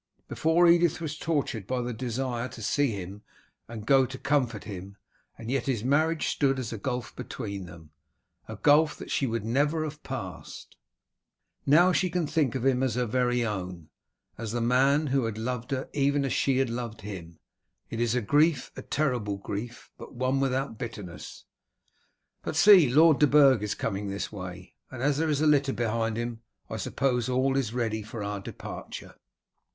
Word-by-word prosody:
Before, 165 +2 +3
Edith 170 -1 +4
was 155 -2 -4
tortured 145 - -2
by 130 0 -1
the 120 0 -3
desire 125 +1 -3
to 115 -3 -10
see 145 +6 +2
him 100 -1 -6 0.5
and 110 -2 -8
to 135 -1 +3
comfort 130 -7 0
him, 100 -1 -8 0.4
and 115 +2 -6
yet 135 -1 -1
his 120 -6 -1
marriage 155 +5 +2
stood 135 -1 +1
as 120 -3 -4
a 110 - -5
gulf 125 +2 -4
between 100 -6 -6
them, 80 -3 -13 0.6
a - - -6
gulf 150 +1 +4
that - - -8
she 135 - +1
would 115 -2 -2
never 145 +7 +1
have 150 -1 -6
passed. 95 -10 -7 0.9
Now 170 +6 +6
she 185 0 +1
can 175 -1 -1
think 145 -4 0
of 130 -1 -2
him 130 -1 +3
as 130 -4 0
her 125 0 +1
very 125 +1 +1
own, 90 -6 -5 0.5
as 115 -1 -4
the 120 - 0
man 135 +5 +3
who 135 -3 +1
had 110 -2 -3
loved 125 +2 -3
her 135 -2 -2
even 140 0 +1
as 135 - -1
she 135 -2 +2
had 130 -3 +1
loved 115 -2 -5
him. 90 -5 -8 0.5
It 115 - -4
is 120 0 +1
a 125 - +1
grief, 150 +7 +2
a - - -6
terrible 125 -9 -1
grief, 110 +4 -6
but - - -11
one 130 +2 0
without 135 -3 -1
bitterness. 105 -7 -8 1.0
But - - -4
see, 190 -9 +7
Lord 155 +3 +5
de 150 - +6
Burg 135 -5 +6
is 105 -1 -2
coming 100 +1 -3
this 100 0 -4
way, 90 -2 -8 0.2
and 130 -1 -6
as 145 0 +2
there 160 0 +1
is 150 -1 +1
a - - +3
litter 140 -3 +3
behind 115 -1 -1
him 120 -1 -4 0.3
I - - -3
suppose 125 -3 0
all 130 +1 +1
is 130 -6 0
ready 115 -3 -1
for 110 0 -7
our 100 0 -3
departure." 100 - -8
125 Hz, 185 wpm, -28 LUFS, 110-140 Hz, 1.0 s, see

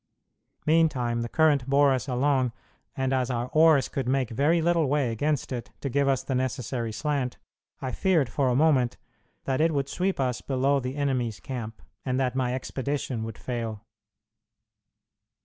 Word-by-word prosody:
Meantime 135 -7 +2
the 115 - -3
current 145 -4 +2
bore 140 0 +5
us 130 +2 -2
along, 130 -1 +1 0.5
and 130 0 0
as 130 -1 0
our 120 0 -2
oars 155 -2 +5
could 135 -2 -3
make 130 -2 0
very 145 +8 +2
little 165 -2 +2
way 140 -3 +1
against 145 +6 -1
it 120 -2 -4
to 140 - -3
give 140 +2 +1
us 135 -1 +1
the 135 - -3
necessary 125 -2 -2
slant, 140 0 -2 0.5
I 130 - -2
feared 170 -7 +2
for 130 +2 0
a 125 - +1
moment 130 -4 +3 0.5
that 135 +1 0
it 160 -1 +2
would 140 -1 -1
sweep 185 -1 -1
us 125 -2 0
below 135 +1 +1
the 130 +1 -4
enemy's 130 -7 -1
camp, 115 -2 -6 0.2
and 130 0 -1
that 130 -2 0
my 125 -1 0
expedition 130 -2 -3
would 115 -2 -7
fail. 115 -3 -5
130 Hz, 165 wpm, -27 LUFS, 125-145 Hz, 0.5 s, bore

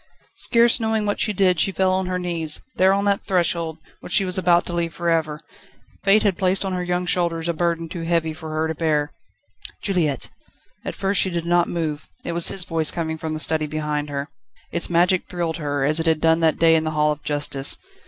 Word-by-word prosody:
Scarce 235 +1 +4
knowing 220 -1 0
what 205 - -1
she 215 - +1
did, 185 -3 +2
she 195 - +3
fell 185 +1 +1
on 190 0 -1
her 180 0 -1
knees, 170 -4 -1 0.2
there 190 +1 +4
on 200 +1 +1
that 200 -1 +1
threshold, 170 -3 0 0.2
which - - -11
she 195 - +3
was 185 0 -2
about 175 -2 +3
to 175 - -6
leave 170 -1 -2
for 170 0 -1
ever. 155 -2 0 0.6
Fate 200 +2 +4
had 200 -4 0
placed 190 +1 +1
on 190 - -2
her 180 -1 -2
young 180 0 -1
shoulders 170 -2 0
a 170 - 0
burden 165 0 -1
too 165 +1 -6
heavy 165 -1 0
for 160 0 -9
her 155 +1 -1
to 160 - -2
bear. 150 -2 0 0.7
"Juliette!" 165 -9 -1 0.5
At - - -5
first 195 +1 +1
she 190 - +1
did 170 -2 -3
not 175 0 +2
move. 155 -3 -4 0.2
It - - -2
was 170 0 +2
his 190 - +1
voice 165 -3 0
coming 160 -2 -3
from 160 0 -4
the - - -4
study 155 -1 +1
behind 150 -1 -3
her. 140 0 -4 0.4
Its 170 - 0
magic 175 +2 +2
thrilled 170 -2 -2
her, 145 -3 -2
as 155 +3 +3
it 165 - -1
had 160 -1 +2
done 160 +1 +3
that 160 -2 +2
day 165 0 +5
in 160 - +2
the 155 - -1
Hall 150 0 +3
of 150 0 -5
Justice. 145 -2 +1
170 Hz, 230 wpm, -22 LUFS, 155-180 Hz, 0.7 s, day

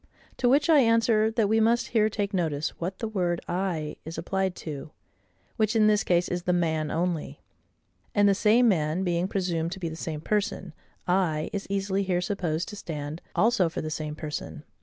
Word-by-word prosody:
To 245 - +2
which 285 +4 +4
I 320 -3 +6
answer, 230 -2 +3
that 225 -2 +1
we 220 +2 +3
must 235 +2 +2
here 215 -2 +3
take 205 -1 -2
notice 160 -5 0
what 185 +3 -3
the 225 - -3
word 180 -5 -1
I 175 -4 -2
is 160 +1 -7
applied 190 -1 -1
to; 150 -1 -6 0.7
which, 215 0 +1
in 220 -1 +5
this 210 -1 +4
case, 175 0 +2
is 180 0 -2
the 180 +1 0
MAN 160 -3 0
only. 170 0 -2 0.8
And 205 0 +5
the 200 - +5
same 220 +5 +4
man 165 -2 +1
being 175 0 0
presumed 175 -4 -1
to 190 - -8
be 170 -3 -3
the 160 - -7
same 160 -2 -5
person, 200 -3 -2 0.3
I 175 -4 +1
is 200 -1 -4
easily 195 0 0
here 185 -2 0
supposed 180 -3 -2
to 210 - -7
stand 150 -4 -6
also 220 -6 +3
for 165 - -4
the 155 - -4
same 150 -1 -4
person. 155 0 -6
185 Hz, 195 wpm, -27 LUFS, 165-210 Hz, 0.8 s, I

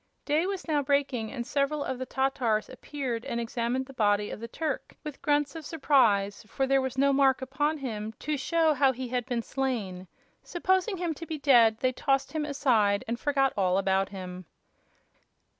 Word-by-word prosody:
Day 310 +5 +1
was 390 -2 -4
now 300 -2 +2
breaking, 270 -5 0
and 240 -3 -4
several 285 +2 0
of 260 - -4
the 260 - -4
Tatars 260 -5 0
appeared 260 -3 -4
and 250 -3 -3
examined 235 +2 -2
the 270 - -13
body 205 -3 +1
of - - -6
the 230 - -6
Turk 300 +4 -4
with 300 -3 -7
grunts 290 0 +1
of 325 - -6
surprise, 235 -11 +2
for 270 - -1
there 270 0 +3
was 260 0 -4
no 280 +1 +4
mark 270 -1 +4
upon 290 +4 -1
him 220 -6 -4
to 300 +6 -3
show 320 +2 +2
how 270 -1 +3
he 255 0 -5
had 250 0 -2
been 240 -3 -1
slain. 215 -10 -3 0.3
Supposing 375 +3 0
him 345 -2 -1
to 330 +2 -9
be 315 - -4
dead, 240 -6 +5
they 255 - +2
tossed 270 +1 0
him 310 -1 -2
aside 230 -9 +2
and 235 +1 -3
forgot 275 -2 +1
all 185 -2 +2
about 195 0 +1
him. 185 -2 -8
265 Hz, 190 wpm, -28 LUFS, 230-290 Hz, 0.3 s, dead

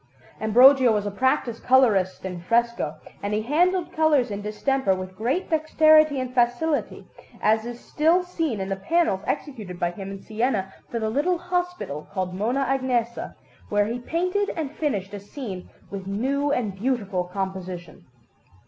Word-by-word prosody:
Ambrogio 250 +4 +6
was 210 -1 0
a 205 - -2
practised 235 +1 0
colourist 210 -9 +3
in 180 -2 -5
fresco, 235 -4 0 0.3
and 205 +1 -1
he 215 - -1
handled 350 +7 +1
colours 300 -7 +3
in 200 0 -4
distemper 215 +1 0
with 185 0 -7
great 255 - -1
dexterity 310 -2 +4
and 255 -1 -4
facility, 245 +6 0 0.3
as 220 +1 +2
it 240 - -4
is - - -16
still 330 +7 +2
seen 325 - -2
in 190 - -3
the 195 - 0
panels 195 - +1
executed 210 -11 -4
by 175 - 0
him 195 +2 -7
in 195 0 -7
Siena 215 -3 -1 0.2
for 235 - -3
the 220 -1 -1
little 320 +8 +1
hospital 355 - -3
called 185 -2 -3
Mona 240 +8 0
Agnesa, 250 -3 -1 0.3
where 205 0 +2
he 235 +3 -3
painted 365 +9 -1
and 305 -4 -3
finished 205 -12 -2
a 205 - -5
scene 200 -3 -7 0.2
with 195 -1 -6
new 275 +8 0
and 230 -8 0
beautiful 200 -4 -1
composition. 185 -3 -6
235 Hz, 160 wpm, -24 LUFS, 195-285 Hz, 0.3 s, Ambrogio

